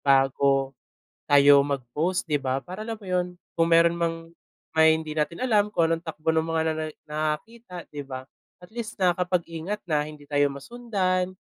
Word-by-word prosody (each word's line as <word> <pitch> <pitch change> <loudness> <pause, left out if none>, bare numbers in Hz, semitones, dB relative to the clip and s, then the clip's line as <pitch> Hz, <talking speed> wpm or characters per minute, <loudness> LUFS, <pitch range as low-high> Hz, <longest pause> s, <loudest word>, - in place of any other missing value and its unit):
bago 135 0 +3 0.6
tayo 140 0 +7
mag-post 145 +6 -1
di 150 -4 0
ba? 130 +1 -2
Para 185 +4 -8
alam 225 - -3
mo 210 - -16
'yun, 180 -1 0 0.3
kung 165 0 +1
meron 170 0 +5
mang 165 0 -2 0.4
may 160 0 +5
hindi 155 -1 -6
natin 160 +9 -2
alam 210 -4 +3
kung 165 -5 +1
anong 165 - 0
takbo 155 +1 -1
ng 160 0 +1
mga 165 0 0
nana 155 0 -3 0.2
nakakakita, 170 +6 -4
di 145 - -5
ba? 130 -2 -7 0.4
At 180 - -17
least 235 -2 -6
nakakapag-ingat 180 0 -1
na 155 -5 +1
hindi 150 -1 -12
tayo 145 -1 +3
masundan 185 - -2
165 Hz, 165 wpm, -25 LUFS, 145-185 Hz, 0.6 s, tayo